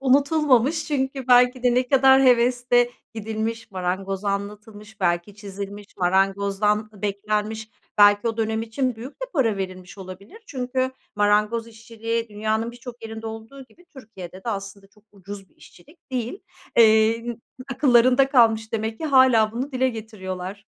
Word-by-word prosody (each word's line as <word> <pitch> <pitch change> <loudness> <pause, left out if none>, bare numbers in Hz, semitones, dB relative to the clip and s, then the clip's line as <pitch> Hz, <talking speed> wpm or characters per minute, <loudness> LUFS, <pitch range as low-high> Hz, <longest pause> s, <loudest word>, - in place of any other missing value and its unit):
Unutulmamış 280 +1 +2
çünkü 265 -3 -3
belki 250 0 +5
de 245 -1 +3
ne 250 0 +1
kadar 265 0 +5
hevesle 245 -1 +3 0.2
gidilmiş, 225 +1 -4
marangoza 190 +2 -3
anlatılmış, 210 +1 -7
belki 175 +2 -1
çizilmiş, 200 0 -8
marangozdan 200 +3 +1
beklenmiş. 210 +2 -3 0.3
Belki 205 +2 +5
o 225 - -3
dönem 220 0 -1
için 240 +2 -2
büyük 245 +5 -8
de - - -7
para 230 - +1
verilmiş 185 0 -7
olabilir. 190 - -11
Çünkü 255 0 -2 0.3
marangoz 210 +2 +2
işçiliği 230 0 -5
dünyanın 220 +2 -2
birçok 240 0 -11
yerinde 225 0 -7
olduğu 225 +5 -9
gibi, 345 +7 -24
Türkiye'de 200 - -11
de - - -4
aslında 200 -2 -6
çok 210 +1 -27
ucuz 195 0 -10
bir - - -35
işçilik 300 - -20
değil. 250 - -4 0.4
Eee, 225 +1 +4 0.4
akıllarında 255 0 +4
kalmış 225 -4 +3
demek 220 0 -3
ki. - - -4
Hâlâ 255 -6 +4
bunu 260 +5 -4
dile 260 0 +1
getiriyorlar. 200 -4 -7
225 Hz, 140 wpm, -23 LUFS, 205-250 Hz, 0.4 s, belki